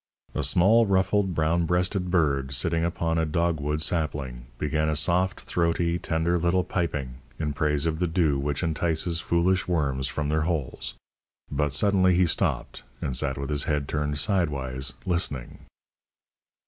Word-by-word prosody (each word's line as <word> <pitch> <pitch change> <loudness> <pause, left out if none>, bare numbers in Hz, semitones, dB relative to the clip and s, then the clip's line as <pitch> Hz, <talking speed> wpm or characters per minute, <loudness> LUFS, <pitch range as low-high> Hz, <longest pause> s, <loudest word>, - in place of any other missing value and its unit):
A - - -1
small, 95 +10 +4
ruffled, 95 -1 +2
brown 80 +2 +1
breasted 90 +2 0
bird, 70 -7 +1
sitting 80 +6 +1
upon 85 -1 0
a - - +2
dog 85 +1 0
wood 75 +2 -1
sapling, 70 -8 -2
began 75 +2 0
a 75 - 0
soft, 90 +5 +1
throaty, 85 0 0
tender 85 +2 0
little 90 +2 +2
piping 70 -10 -3 0.2
in 75 -2 -2
praise 75 +1 0
of 80 -1 -1
the 90 - +1
dew 80 -4 +1
which 70 +3 -2
entices 80 0 0
foolish 85 +3 +1
worms 70 -6 0
from 70 +3 -2
their 80 +1 +1
holes; 75 -8 -3 0.6
but 75 -1 0
suddenly 95 +3 +3
he 90 +1 +4
stopped, 80 - -1 0.2
and 65 - -3
sat 65 0 0
with 70 +2 -4
his 75 0 0
head 75 -2 -1
turned 75 -1 -1
sidewise, 70 - 0
listening. 80 -8 -2
80 Hz, 155 wpm, -26 LUFS, 75-85 Hz, 0.6 s, small